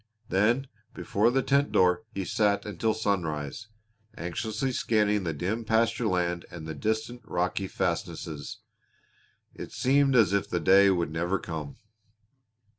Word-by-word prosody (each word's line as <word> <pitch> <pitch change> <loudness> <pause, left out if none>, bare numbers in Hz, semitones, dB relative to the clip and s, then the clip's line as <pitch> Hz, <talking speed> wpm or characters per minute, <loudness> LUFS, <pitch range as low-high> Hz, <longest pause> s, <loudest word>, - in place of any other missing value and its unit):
Then 115 +8 +2 0.3
before 105 +4 +1
the 135 +2 +1
tent 140 +1 +2
door 90 +1 +3
he 95 -1 -4
sat 100 +2 +1
until 110 +1 -1
sunrise, 90 -3 -2 0.5
anxiously 110 - -2
scanning 105 -5 +1
the 80 - 0
dim 95 +10 -2
pasture 115 +1 +1
land 90 -2 0
and 85 -3 -9
the 80 - -5
distant 110 +9 -2
rocky 95 +1 -1
fastnesses. 75 -5 -4 0.9
It - - -8
seemed 135 +1 +2
as 110 -6 +5
if 100 - 0
the 90 - 0
day 100 +2 +6
would 85 -4 0
never 85 +4 0
come. 80 -6 -6
100 Hz, 135 wpm, -28 LUFS, 85-110 Hz, 0.9 s, day